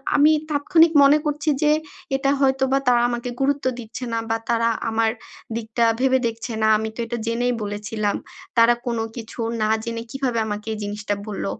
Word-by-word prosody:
আমি 295 +2 +6 0.2
তাৎক্ষণিক 320 +3 +4
মনে 285 +2 +6
করছি 295 +1 -1
যে 300 - +4 0.4
এটা 275 +1 +1
হয়তোবা 265 0 +2
তারা 240 -1 +5
আমাকে 240 +1 -3
গুরুত্ব 280 0 +1
দিচ্ছে 235 +2 -7
না 230 - +1
বা 225 - +1
তারা 230 0 +2 0.2
আমার 225 0 +1 0.5
দিকটা 230 +1 -1 0.2
ভেবে 260 0 +3
দেখছে 230 +1 -5
না। 220 - +3
আমি 220 0 -3
তো - - -12
এটা 235 +1 -4
জেনেই 245 +2 0
বলেছিলাম। 205 0 -2 0.4
তারা 230 +1 +6
কোনো 235 -2 -1
কিছু 230 0 -9 0.2
না 215 - +1
জেনে 230 -1 -4
কিভাবে 260 -4 -1
আমাকে 210 +1 -5
এই - - -5
জিনিসটা 205 0 -3
বলল। 205 - -4
235 Hz, 175 wpm, -22 LUFS, 225-270 Hz, 0.5 s, আমি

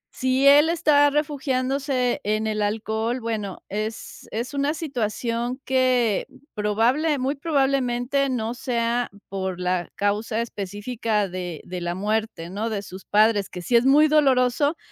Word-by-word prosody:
si 260 +1 +1
él 295 +3 +7
está 300 -4 +4
refugiándose 270 -3 -1
en 215 +1 0
el 215 -1 -1
alcohol, 220 +3 -1
bueno, 215 -4 -4
es 215 +2 -5
es 235 +5 -4
una 285 +3 0
situación 240 -3 -2
que 255 -5 +2 0.3
probable, 235 +9 +1
muy 265 +2 0
probablemente 275 -2 0
no 230 -2 -2
sea 240 -1 -1 0.2
por 190 -2 -3
la 180 -1 -1
causa 210 +2 -1
específica 210 0 -2
de 180 -3 -6
de 180 0 -6
la 175 0 -2
muerte, 210 -3 -2
¿no?, 215 +4 -2
de 205 -2 -3
sus 185 0 -10
padres, 210 -1 +3
que 180 -1 -8
sí 235 - 0
es 235 +2 +5
muy 300 +3 +6
doloroso, 285 0 +3
235 Hz, 140 wpm, -24 LUFS, 210-270 Hz, 0.3 s, él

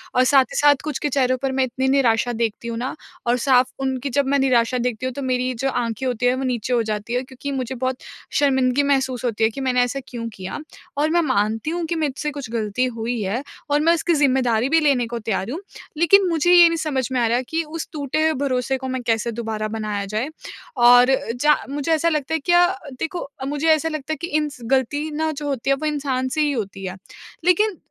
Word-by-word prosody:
और 255 - +5
साथ 270 +1 +5
ही - - -3
साथ 290 0 +6
कुछ 300 -2 -3
के 295 - -1
चेहरों 255 -2 +1
पर 270 - 0
मैं 265 0 +2
इतनी 260 +1 -2
निराशा 245 -3 +2
देखती 230 0 -2
हूँ 230 - -4
ना 250 +6 -3 0.3
और 240 +1 +3
साफ 255 0 +3
उनकी 265 0 -2
जब 285 - +3
मैं 280 +1 +2
निराशा 250 -2 +2
देखती 245 0 -2
हूँ 260 - -2
तो 280 - -6
मेरी 255 0 0
जो 270 +1 0
आँखें 240 0 -2
होती 245 -1 -1
हैं 250 - +3
वो 265 - -3
नीचे 250 -1 -1
हो 240 - +3
जाती 215 +1 -4
है 250 +1 0
क्योंकि 260 +2 -7
मुझे 260 -2 -3
बहुत 255 +1 -2 0.4
शर्मिंदगी 265 -1 +2
महसूस 265 -3 0
होती 225 -2 -1
है - - +3
कि 270 - -6
मैंने 255 -2 +2
ऐसा 245 +3 -2
क्यों 235 -2 -5
किया। 190 +8 -6 0.4
और 300 +2 +2
मैं 345 +1 +3
मानती 225 -2 0
हूँ 345 0 -2
कि 340 - 0
मुझसे 300 -1 -2
कुछ 280 -4 -7
गलती 225 +1 -1
हुई 230 +1 -2
है 205 +7 -2 0.3
और 290 +1 +3
मैं 330 +2 +4
उसकी 340 +1 +1
ज़िम्मेदारी 260 -4 +2
भी 325 - +4
लेने 270 -6 +2
को 235 0 -4
तैयार 215 -2 -2
हूँ 310 - -4 0.4
लेकिन 370 +4 +5
मुझे 330 +1 +2
ये 345 -1 +9
नहीं 335 - -1
समझ 290 -6 -1
में 255 - 0
आ - - +3
रहा 240 +2 +1
कि 325 +1 0
उस 320 +1 -6
टूटे 295 0 -2
हुए 315 0 +3
भरोसे 255 0 0
को 260 0 -6
मैं 260 0 -3
कैसे 225 +1 +1
दोबारा 220 -2 -3
बनाया 210 -2 -3
जाए। 215 +7 -2 0.5
और 245 +1 +7 0.3
ज 300 0 +5
मुझे 290 +3 -2
ऐसा 320 +1 +2
लगता 300 -2 -2
है 320 - +1
क्या 350 +4 +4 0.3
देखो 325 -2 -4 0.2
मुझे 290 +3 -1
ऐसा 315 +1 0
लगता 310 -1 -4
है - - -5
कि 340 - -3
इंस 300 -3 -2
गलती 290 +4 +1
ना 315 +1 -1
जो 295 -1 -5
होती 270 -2 -2
है 275 - +4
वो 275 - -5
इंसान 280 -4 -1
से 310 - +1
ही 295 -1 +2
होती 200 -6 -4
है। 185 0 -5 0.5
लेकिन 370 +2 +3
260 Hz, 235 wpm, -22 LUFS, 240-295 Hz, 0.5 s, ये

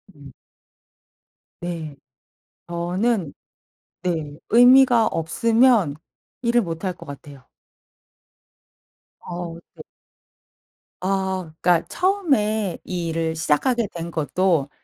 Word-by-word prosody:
음. 140 -1 -14 1.3
네. 165 -4 -5 0.7
저는 175 +1 -1 0.7
네 160 -5 -3
의미가 245 0 +6
없으면 220 - +2 0.5
일을 240 -1 +3
못할 180 0 -3
것 170 -1 -13
같아요. 140 -2 -11 1.7
어 175 -1 -6 0.2
네. - - -10 1.2
아 190 -3 -2
그러니까 175 -2 +3
처음에 220 - 0
이 175 -2 -3
일을 160 0 -1
시작하게 220 - +1
된 170 0 -6
것도 160 -2 0
175 Hz, 160 characters per minute, -22 LUFS, 160-225 Hz, 1.7 s, 의미가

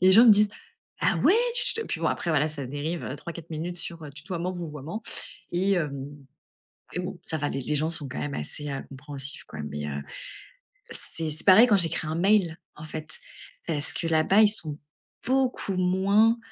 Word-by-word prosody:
Les 190 0 +7
gens, 225 +4 +9
ils 240 - +7
me - - +11
disent: 210 0 +5 0.5
«ah - - +3
ouais, 390 - +5 0.2
tu - - 0
tu» 455 0 -2
puis - - -3
bon, - - +1
après 170 - -1
voilà, 155 0 +3
ça 145 -3 -4
dérive, 150 +5 -3
heu, 135 - -4
3-4 170 +2 -8
minutes 165 +3 -4
sur, 165 0 -5
heu, 145 - -8
tutoiement-vouvoiement, 170 +2 -5 0.5
et 190 +2 +2
heu, 150 -4 -1 1.0
et 180 - -2
bon, 180 0 -5
ça 160 - -1
va, 145 0 -1
les 135 - -3
les 150 +4 -1
gens 155 +2 0
sont 160 -4 -3
quand - - -5
même 145 -1 -3
assez, 145 - -4
heu, 135 - -3
compréhensifs, 140 0 -5
quoi, 75 - -10
mais 75 0 -4
heu, 70 0 -4 0.9
c'est 160 -2 -3
c'est 150 - -3
pareil 210 +6 +9
quand 205 - +6
j'écris 165 -2 +2
un 155 - -2
mail, 185 -3 +3 0.2
en 150 - -9
fait, 155 0 -7 0.5
parce 150 -3 0
que 165 - -3
là-bas, 165 +7 +4
ils 210 - +7
sont 155 -8 +2 0.5
beaucoup 255 -7 +1
moins, 200 +5 +3
165 Hz, 200 wpm, -27 LUFS, 150-190 Hz, 1.0 s, me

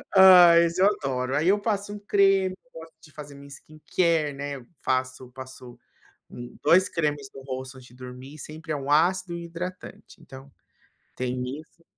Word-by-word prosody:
Ai, 180 -3 +8
esse 170 +2 -2
eu 195 - +6
adoro. 135 -8 -2
Aí, 155 +4 0
eu 205 +2 +3
passo 205 -1 -3
um 210 - -8
creme, 195 -2 +2 0.2
gosto 165 0 -12
de 155 - -18
fazer 145 -1 -11
minha 140 0 -13
skincare, 155 +1 -2
né, 140 0 -5
eu 130 - -12 0.2
passo 130 -1 -2
passo 130 -1 -11 0.9
2 180 +5 +4
cremes 145 -4 -2
no 135 - -10
rosto, 130 0 -7
antes 130 -1 -14
de 125 - -19
dormir, 130 +3 -11
sempre 155 +2 -8
é - - -2
um 140 0 -6
ácido 175 +4 +2
e - - -4
um - - -6
hidratante, 175 +1 -9
então 135 -3 -13 0.7
tem 125 0 -3 0.2
isso 165 +1 -22
150 Hz, 175 wpm, -25 LUFS, 130-175 Hz, 0.9 s, Ai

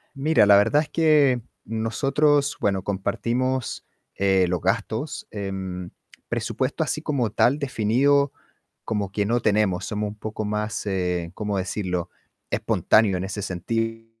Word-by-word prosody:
Mira, 140 -5 +4
la 100 -1 +7
verdad 145 +9 +4
es 155 - -6
que 150 -6 +4 0.2
nosotros, 140 +6 +1
bueno, 95 -2 0
compartimos, 120 +6 -2 0.3
eh, 95 -1 +3
los 90 0 0
gastos. - - -2
Em, 95 -3 -5 0.4
presupuesto - - -1
así - - -2
como 130 -7 0
tal 135 +5 +3
definido 140 +2 +2 0.5
como 105 -3 -2
que 105 0 0
no 120 +4 +1
tenemos, 105 -4 +1
somos 105 -1 -2
un 105 - -9
poco 110 0 -5
más, 105 +1 -2
eh, 90 -3 -1
cómo 105 0 -2
decirlo, 90 -2 -2 0.4
espontáneos 105 -4 +2
en - - -3
ese 100 +2 -4
sentido. 115 +5 -3
105 Hz, 135 wpm, -24 LUFS, 95-130 Hz, 0.5 s, la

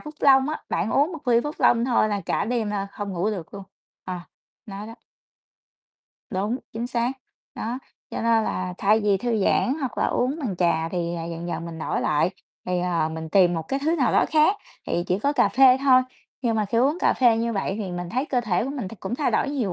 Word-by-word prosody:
Phúc 300 0 -9
Long 270 0 +5
á, 310 - -4
bạn 200 - -1
uống 290 +6 +2
một 310 -5 -7
ly 235 -1 +5
Phúc 295 +1 -3
Long 235 -1 +4
thôi 240 -3 +2
là 205 -1 -1
cả - - 0
đêm 225 -2 -1
là 200 -1 -2
không 205 -1 -5
ngủ 185 +4 0
được 185 -5 -6
luôn, 200 - -7 0.4
ờ, 185 - -4 0.5
nó 200 0 -7
đó. 225 - -9 1.4
Đúng, 205 +5 -1
chính 230 +2 -3
xác, 245 0 0 0.4
đó, 235 +3 -4 0.3
cho - - -4
nên 230 -1 +3
là 185 -3 -3
thay 210 +3 +3
vì 205 -2 +2
thư 220 -1 0
giãn 255 - +2
hoặc 265 -3 -3
là - - +2
uống 265 +5 0
bằng 220 -10 -3
trà 170 -2 +1
thì, 170 0 -2
à, 165 -1 -4
dần 170 +1 -5
dần 165 -1 -3
mình 165 -1 -7
đổi - - -2
lại, 155 +4 +1 0.4
thì, 180 -1 0
ờ, 170 -3 0
mình 160 0 -6
tìm 180 0 +4
một 165 - -2
cái 270 - 0
thứ 320 +3 +2
nào 265 -6 +2
đó - - +4
khác 310 +6 +4 0.3
thì 175 - -1
chỉ 180 +1 +1
có 280 +7 +1
cà 290 - +3
phê 260 0 +6
thôi, 260 -2 +5 0.4
nhưng 230 -3 +1
mà 215 - +1
khi 210 +3 0
uống 280 +7 +2
cà - - +4
phê 240 -3 +4
như 230 +1 -1
vậy 195 -2 -1
thì 200 -4 -4
mình 175 0 -4
thấy 255 +7 0
cơ 250 -4 +1
thể 210 -4 0
của 265 - -3
mình 260 -9 -4
thì 225 - -10
cũng 195 +5 -3
thay 290 +3 0
đổi 280 - +1
nhiều 245 -10 -1
220 Hz, 245 wpm, -24 LUFS, 180-255 Hz, 1.4 s, phê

